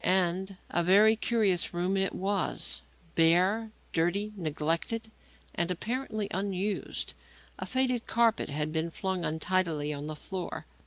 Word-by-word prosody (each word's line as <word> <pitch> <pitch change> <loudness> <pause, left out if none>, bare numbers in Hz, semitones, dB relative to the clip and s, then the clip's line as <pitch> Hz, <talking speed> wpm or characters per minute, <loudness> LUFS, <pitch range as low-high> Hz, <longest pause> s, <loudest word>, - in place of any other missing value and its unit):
And 185 +1 +2
a 175 - +2
very 205 +5 +6
curious 210 -7 +1
room 180 +3 +1
it 195 0 0
was; 195 0 -1 0.3
bare, 185 +7 +4 0.2
dirty, 195 +6 +1
neglected 170 +7 -2 0.4
and, 170 0 +1
apparently, 215 +3 -2
unused. 195 +1 -2 0.5
A - - -4
faded 255 -2 +1
carpet 230 -1 +2
had 150 +2 -1
been 160 +1 0
flung 190 +1 -2
untidily 160 -1 0
on 145 +1 -5
the 155 - -4
floor. 185 +3 -5
185 Hz, 125 wpm, -30 LUFS, 165-210 Hz, 0.5 s, very